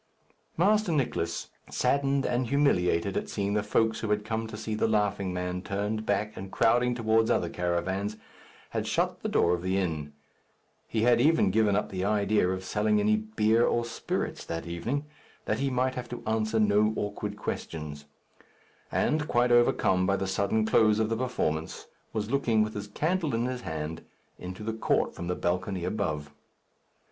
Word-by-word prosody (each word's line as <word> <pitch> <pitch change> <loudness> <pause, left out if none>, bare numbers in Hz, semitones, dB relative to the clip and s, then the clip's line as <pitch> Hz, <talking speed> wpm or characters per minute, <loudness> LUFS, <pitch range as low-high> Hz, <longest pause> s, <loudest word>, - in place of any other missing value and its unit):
Master 205 +2 +3
Nicless, 115 - -1 0.2
saddened 140 -1 +1
and 125 0 0
humiliated 100 -10 +2
at - - -2
seeing 100 -1 -1
the 105 - +2
folks 110 +1 +1
who 110 - -3
had 105 0 0
come 110 +1 -2
to 110 - -7
see 110 0 -4
"The 105 - +1
Laughing 105 -3 +1
Man" 90 0 -3
turned 105 +3 -3
back 105 +1 0
and 95 0 -7
crowding 120 +2 +3
towards 110 -1 +2
other 85 - +1
caravans, 95 +5 -2 0.5
had - - -2
shut - - 0
the - - -2
door 85 - +3
of 90 - -1
the 95 +1 0
inn. 80 -6 -2 0.7
He 110 -1 0
had 120 0 +5
even 155 -7 +4
given 105 -1 +3
up 105 - 0
the 95 -1 -2
idea 105 -1 +2
of 95 0 -2
selling 105 +2 +1
any 105 +1 +3
beer 110 +1 +2
or 120 0 +1
spirits 115 0 -3
that 80 0 -4
evening, 115 - -3 0.4
that - - -1
he 140 0 +1
might 130 0 +1
have 125 -1 -6
to 120 - -7
answer 110 0 0
no 105 0 +3
awkward 105 0 -3
questions; 75 -7 -5 0.9
and, 150 0 +1
quite 120 -2 +2
overcome 95 -6 +3
by 100 - +3
the 95 - -2
sudden 100 +3 +1
close 110 -1 +4
of 110 0 +1
the 115 - 0
performance, 80 -11 -2 0.3
was 110 0 -3
looking, 115 -6 +3
with 110 0 -4
his 105 0 -5
candle 160 - 0
in 115 +1 0
his 125 0 -3
hand, 80 -3 -5 0.4
into 90 +3 -7
the 110 +1 -2
court 110 - +1
from 85 - -6
the 90 - -1
balcony 90 +1 -1
above. 75 -7 -2
105 Hz, 175 wpm, -28 LUFS, 95-115 Hz, 0.9 s, had